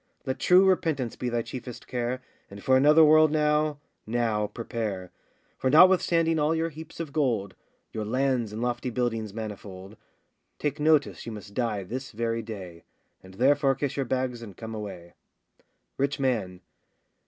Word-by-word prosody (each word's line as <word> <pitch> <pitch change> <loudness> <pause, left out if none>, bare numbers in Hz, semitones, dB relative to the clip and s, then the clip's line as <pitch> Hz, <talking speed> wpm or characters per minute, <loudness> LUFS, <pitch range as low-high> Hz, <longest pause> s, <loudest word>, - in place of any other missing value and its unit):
Let 130 0 -3
true 180 +5 +6
repentance 160 -10 +1
be 125 - -3
thy 120 -1 -1
chiefest 125 +1 -8
care, 125 +1 -3 0.3
And 100 0 -11
for 130 - +4
another 150 +4 +6
world 155 0 +6
now, 150 -1 +1 0.3
now 110 -2 0
prepare. 105 -4 -5 0.5
For 130 - +1
notwithstanding 165 0 +5
all 150 +2 +2
your 165 +1 0
heaps 160 +1 -11
of 160 -4 -5
gold, 115 -11 0 0.4
Your 110 - -3
lands 125 0 0
and 110 +2 -4
lofty 120 +1 -1
buildings 115 -3 -2
manifold, 100 -2 -8 0.6
Take 150 0 -2
notice 150 -4 +2
you - - -4
must 105 -2 -9
die 110 -4 -1
this 130 +7 -6
very 115 +1 -1
day; 95 -7 -9 0.4
And 95 0 -14
therefore 135 +3 +3
kiss 135 +1 -3
your 135 -3 -2
bags 130 -2 -1
and 105 -6 -10
come 115 -1 -7
away. 95 -5 -7 0.8
RICH 140 +1 0
MAN. 105 -9 -1
125 Hz, 155 wpm, -27 LUFS, 110-145 Hz, 0.8 s, true